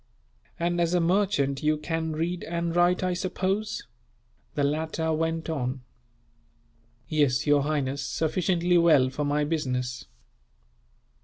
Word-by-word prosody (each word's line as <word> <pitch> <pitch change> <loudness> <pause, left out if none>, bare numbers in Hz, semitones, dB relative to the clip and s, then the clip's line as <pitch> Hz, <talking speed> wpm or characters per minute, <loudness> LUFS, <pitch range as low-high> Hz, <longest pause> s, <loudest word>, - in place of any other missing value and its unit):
"And 175 +1 0
as 170 +1 +1
a - - +4
merchant, 170 -6 +1
you 155 0 +2
can 160 +1 -2
read 170 +3 -2
and 170 0 -2
write, 175 +1 +3
I 185 0 +1
suppose?" 190 +3 -2 0.7
the 145 - +1
latter 160 +2 -1
went 165 +1 -1
on. 130 -5 -2 1.3
"Yes, 145 -3 +2
your 145 -1 +4
highness, 140 -2 -1
sufficiently 175 +4 +1
well 150 -6 +5
for 145 +2 -2
my 145 +1 +1
business." 125 -5 -2
160 Hz, 125 wpm, -27 LUFS, 145-175 Hz, 1.3 s, well